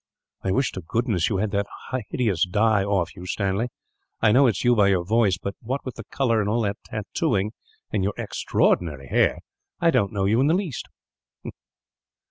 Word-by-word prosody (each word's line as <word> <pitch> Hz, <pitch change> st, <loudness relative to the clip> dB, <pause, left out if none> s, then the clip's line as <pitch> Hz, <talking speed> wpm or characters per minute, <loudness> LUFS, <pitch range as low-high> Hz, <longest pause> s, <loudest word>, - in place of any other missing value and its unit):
"I 95 Hz, -, -1 dB
wish 130 Hz, +8 st, +1 dB
to 95 Hz, -, -6 dB
goodness 105 Hz, 0 st, 0 dB
you 100 Hz, -, 0 dB
had 105 Hz, +1 st, -1 dB
that 100 Hz, +1 st, 0 dB, 0.4 s
hideous 105 Hz, -10 st, +1 dB
dye 105 Hz, +2 st, +3 dB
off 95 Hz, -4 st, 0 dB
you, 90 Hz, -1 st, -9 dB
Stanley. 100 Hz, +4 st, 0 dB, 0.5 s
I 110 Hz, -, +4 dB
know 130 Hz, +4 st, +6 dB
it 115 Hz, -, +2 dB
is -, -, -3 dB
you 120 Hz, 0 st, +4 dB
by 105 Hz, -3 st, +4 dB
your 95 Hz, -3 st, +2 dB
voice 105 Hz, -2 st, +3 dB
but, 100 Hz, +1 st, -4 dB
what 130 Hz, +4 st, -4 dB
with 130 Hz, -, -4 dB
the 115 Hz, -, -9 dB
colour, 115 Hz, -4 st, +1 dB
and 100 Hz, -, -1 dB
all 115 Hz, +2 st, +1 dB
that 100 Hz, -1 st, -1 dB
tattooing, 105 Hz, -1 st, -1 dB, 0.4 s
and 100 Hz, -3 st, 0 dB
your 100 Hz, +1 st, 0 dB
extraordinary 75 Hz, -6 st, 0 dB
hair, -, -, +3 dB, 0.4 s
I 170 Hz, -1 st, +4 dB
don't 115 Hz, -8 st, +2 dB
know 100 Hz, -3 st, -1 dB
you 110 Hz, +5 st, +3 dB
in 140 Hz, -, +3 dB
the 160 Hz, -, +4 dB
least." 180 Hz, -, -3 dB
105 Hz, 195 wpm, -24 LUFS, 95-120 Hz, 0.5 s, know